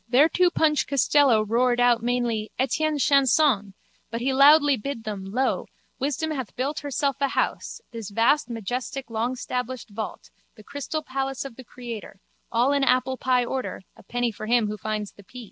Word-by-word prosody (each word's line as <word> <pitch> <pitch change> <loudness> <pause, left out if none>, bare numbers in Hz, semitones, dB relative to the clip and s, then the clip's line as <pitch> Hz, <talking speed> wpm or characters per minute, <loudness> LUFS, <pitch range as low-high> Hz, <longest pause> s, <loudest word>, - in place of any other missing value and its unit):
Thereto 320 +7 +5
Punch 300 -5 +1
Costello 275 -4 +4
roared 240 +3 +2
out 245 -2 +4
mainly 235 -3 -1
Etienne 300 +4 0
chanson 270 -7 +3 0.3
but 230 +1 -4
he 265 +3 0
loudly 290 +1 +6
bid 255 0 -5
them, 205 -3 -5
lo, 250 +7 -1 0.3
wisdom 295 +4 -1
hath 260 -7 -5
built 275 +4 -2
herself 280 -1 -1
a 280 - +3
house, 275 - -2
this 225 -4 -7
vast 235 +6 +2
majestic 245 +3 -4
longstablished 250 +1 -3
vault, 215 +1 -6 0.2
the 215 - -15
crystal 285 +5 -4
palace 270 -1 -3
of 270 - -8
the 260 - -11
Creator, 230 -4 -9 0.3
all 240 +4 +2
in 285 0 +2
applepie 255 -1 +2
order, 260 -7 -4
a - - -16
penny 245 +3 -2
for 215 0 -8
him 235 -1 +3
who 210 - -3
finds 215 0 -4
the 200 - -17
pea. 250 +6 -12
250 Hz, 165 wpm, -25 LUFS, 230-275 Hz, 0.3 s, loudly